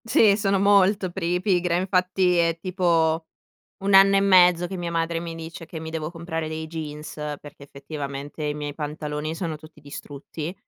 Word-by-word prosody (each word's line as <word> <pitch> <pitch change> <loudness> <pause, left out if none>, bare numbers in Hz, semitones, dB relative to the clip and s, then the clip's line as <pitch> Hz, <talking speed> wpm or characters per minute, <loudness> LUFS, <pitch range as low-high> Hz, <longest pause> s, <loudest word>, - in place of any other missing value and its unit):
Sì, 225 -4 +5
sono 200 -1 +1
molto 200 -1 +3
pri 175 -1 -1
pigra, 180 -3 +1
infatti 180 0 +1
è 165 -1 +2
tipo 165 -3 +1 0.5
1 200 0 0
anno 195 +1 +7
e - - +4
mezzo 180 -3 +5
che 190 +2 -6
mia 175 -1 -4
madre 165 0 -1
mi 165 -1 -6
dice 165 0 -8
che 160 0 -8
mi 160 - -7
devo 160 -1 -4
comprare 165 -2 -4
dei 160 0 -5
jeans, 155 -2 -7 0.3
perché 145 -1 -13
effettivamente 140 +1 -7
i 150 - 0
miei 145 -1 -5
pantaloni 150 0 -4
sono 165 -2 -4
tutti 155 0 -16
distrutti, 145 +3 -8
165 Hz, 175 wpm, -24 LUFS, 155-185 Hz, 0.5 s, anno